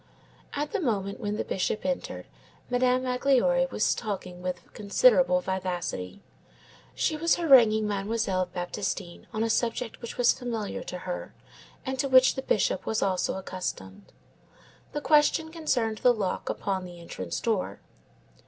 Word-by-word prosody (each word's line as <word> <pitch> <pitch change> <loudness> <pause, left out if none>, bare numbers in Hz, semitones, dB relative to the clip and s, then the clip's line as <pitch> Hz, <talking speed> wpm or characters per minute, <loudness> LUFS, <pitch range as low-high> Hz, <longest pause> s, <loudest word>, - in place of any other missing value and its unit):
At 295 +1 -2
the 435 - -1
moment 200 - -1
when 205 0 -2
the - - -1
Bishop 195 +3 -2
entered, 270 -1 -3 0.5
Madame 250 +1 +2
Magloire 265 +1 +2
was 215 - +1
talking 185 -5 -5
with 180 -1 -5
considerable 195 -4 +4
vivacity. 180 - -3 0.7
She 315 - +1
was 330 +2 +2
haranguing 235 -10 +5
Mademoiselle 200 -2 -1
Baptistine 180 0 -4
on 220 0 -1
a 230 - 0
subject 230 0 -1
which 235 - -7
was 245 -1 +5
familiar 240 -2 -4
to 180 - -5
her 180 0 -6 0.5
and 265 0 -3
to 275 - 0
which 255 0 +7
the 265 - -4
Bishop 210 -6 0
was 220 - +1
also 190 -2 0
accustomed. 100 - -6 0.8
The 295 - -3
question 305 +2 +3
concerned 245 -10 -1
the 245 -1 +4
lock 195 -4 -2
upon 190 -2 -2
the 175 -1 -10
entrance 95 - -5
door. - - -1
215 Hz, 145 wpm, -27 LUFS, 185-255 Hz, 0.8 s, which